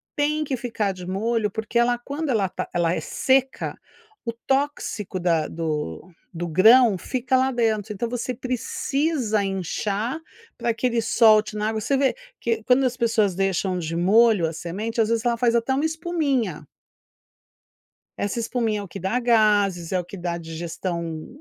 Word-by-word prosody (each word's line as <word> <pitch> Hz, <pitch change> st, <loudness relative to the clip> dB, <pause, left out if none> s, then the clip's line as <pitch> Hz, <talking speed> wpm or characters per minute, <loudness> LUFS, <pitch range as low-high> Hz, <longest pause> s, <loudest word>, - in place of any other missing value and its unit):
tem 300 Hz, +1 st, +1 dB
que 275 Hz, -3 st, -2 dB
ficar 225 Hz, -4 st, -2 dB
de 180 Hz, -1 st, -9 dB
molho, 215 Hz, +3 st, 0 dB
porque 220 Hz, +3 st, -2 dB
ela 240 Hz, 0 st, +3 dB
quando 285 Hz, +5 st, -4 dB
ela 215 Hz, -6 st, +2 dB
está -, -, -5 dB
ela 170 Hz, -1 st, +1 dB
é -, -, -1 dB
seca, 265 Hz, 0 st, 0 dB, 0.5 s
o 230 Hz, -, -2 dB
tóxico 235 Hz, -6 st, -2 dB
da 165 Hz, -3 st, +1 dB
do 155 Hz, -, -4 dB, 0.2 s
do 175 Hz, 0 st, -4 dB
grão 220 Hz, +6 st, +6 dB
fica 260 Hz, +5 st, 0 dB
lá 260 Hz, +1 st, +2 dB
dentro. 220 Hz, -3 st, 0 dB
Então 210 Hz, +4 st, -3 dB
você 245 Hz, +1 st, -3 dB
precisa 255 Hz, -1 st, -1 dB
inchar 200 Hz, -, -2 dB, 0.4 s
para 235 Hz, -, 0 dB
que 230 Hz, +2 st, -3 dB
ele 235 Hz, -1 st, 0 dB
solte 215 Hz, -1 st, +4 dB
na 210 Hz, +1 st, 0 dB
água. 220 Hz, 0 st, -2 dB
Você 275 Hz, +6 st, +1 dB
vê 270 Hz, -1 st, +2 dB, 0.2 s
que 230 Hz, -1 st, -1 dB
quando 255 Hz, +3 st, +3 dB
as 250 Hz, -1 st, -1 dB
pessoas 225 Hz, -5 st, +2 dB
deixam 190 Hz, -1 st, 0 dB
de 165 Hz, -1 st, -4 dB
molho 205 Hz, +2 st, +4 dB
a 160 Hz, -, -5 dB
semente, 210 Hz, +8 st, -3 dB
às 220 Hz, -, +1 dB
vezes, 230 Hz, 0 st, 0 dB
ela 235 Hz, -1 st, +2 dB
faz 235 Hz, 0 st, +2 dB
até 235 Hz, +3 st, +1 dB
uma 280 Hz, +4 st, +1 dB
espuminha. 290 Hz, -, -1 dB, 1.5 s
Essa 200 Hz, +3 st, -2 dB
espuminha 225 Hz, -2 st, -1 dB
é -, -, -5 dB
o -, -, -7 dB
que -, -, -8 dB
dá 190 Hz, +7 st, 0 dB
gases, 210 Hz, -7 st, +2 dB
é 185 Hz, -, +2 dB
o 180 Hz, -, -3 dB
que 185 Hz, -, -10 dB
dá 175 Hz, -1 st, -3 dB
a -, -, -4 dB
digestão 165 Hz, 0 st, -5 dB
220 Hz, 175 wpm, -24 LUFS, 185-245 Hz, 1.5 s, grão